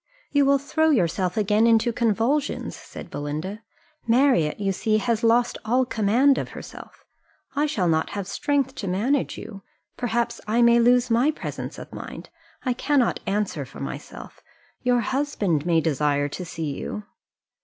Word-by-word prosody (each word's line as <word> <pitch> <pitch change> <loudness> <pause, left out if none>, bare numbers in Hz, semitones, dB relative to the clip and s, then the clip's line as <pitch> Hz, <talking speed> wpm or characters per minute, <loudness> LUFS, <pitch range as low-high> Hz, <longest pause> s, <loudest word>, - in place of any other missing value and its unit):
"You 285 -1 +4
will 280 0 +5
throw 315 +3 +1
yourself 185 - +1
again 210 +2 +3
into 230 +1 +3
convulsions," 235 +5 0
said - - -11
Belinda. 155 +9 -4 0.5
"Marriott, 235 - +3
you 195 -1 0
see, 215 +3 +1
has 230 0 0
lost 235 +1 +3
all 250 +4 +2
command 240 +5 +3
of - - -4
herself - - -11 0.5
I 295 +2 +2
shall 200 -12 0
not 160 -1 +1
have 200 - -3
strength 280 +4 0
to 200 - -4
manage 235 +10 0
you 200 -3 -9 0.4
perhaps 235 -1 -1
I 230 +3 +3
may 235 0 +6
lose 245 +1 +4
my 240 +6 +4
presence 310 - -5
of - - -10
mind - - -8 0.3
I 255 - +1
cannot 260 -1 +1
answer 205 +1 -1
for - - -12
myself - - -8 0.4
your 245 -1 +2
husband 210 - -1
may 165 -2 +4
desire 145 -2 +1
to 180 +5 -6
see 160 -3 -4
you." 210 - -5
230 Hz, 155 wpm, -24 LUFS, 195-255 Hz, 0.5 s, may